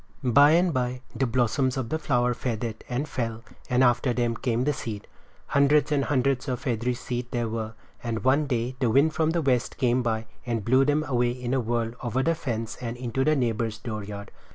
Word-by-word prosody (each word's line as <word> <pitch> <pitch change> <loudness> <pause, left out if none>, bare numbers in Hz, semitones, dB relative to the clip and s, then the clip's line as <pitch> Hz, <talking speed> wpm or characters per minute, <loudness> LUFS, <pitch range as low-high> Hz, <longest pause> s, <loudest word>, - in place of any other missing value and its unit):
By 140 +5 +6
and 175 0 +3
by 125 -1 -1
the 135 - +1
blossoms 130 +2 +1
of 125 -3 -2
the 160 - -1
flower 125 -4 +1
faded 115 -2 -4
and 130 +5 -2
fell 115 -4 -3 0.3
and 125 +1 +3
after 120 0 +3
them 120 -1 0
came 120 -1 -1
the 150 +2 +1
seed. 105 -6 -6 0.4
Hundreds 145 +1 +3
and 140 -2 +2
hundreds 135 0 +1
of 125 -3 -2
feathery 125 0 -1
seed 125 0 -4
there 120 -2 -1
were, 110 0 -4 0.3
and 115 -3 -3
one 140 +3 +3
day 125 -1 -1
the 125 -4 +2
wind 140 +7 +4
from 160 -1 +1
the 165 0 0
west 125 -4 +1
came 125 -1 +2
by, 115 -2 -1 0.2
and 115 -4 -2
blew 130 +3 +4
them 150 +2 +2
away 125 -4 +1
in 125 0 -3
a 135 - +2
whirl 115 -1 -1
over 125 +2 -1
the 165 - +2
fence 115 -8 -4
and 120 -1 -4
into 125 +1 -1
the 155 +2 +3
neighbor's 115 -4 -1
dooryard. 105 -3 -6
125 Hz, 205 wpm, -26 LUFS, 115-135 Hz, 0.4 s, By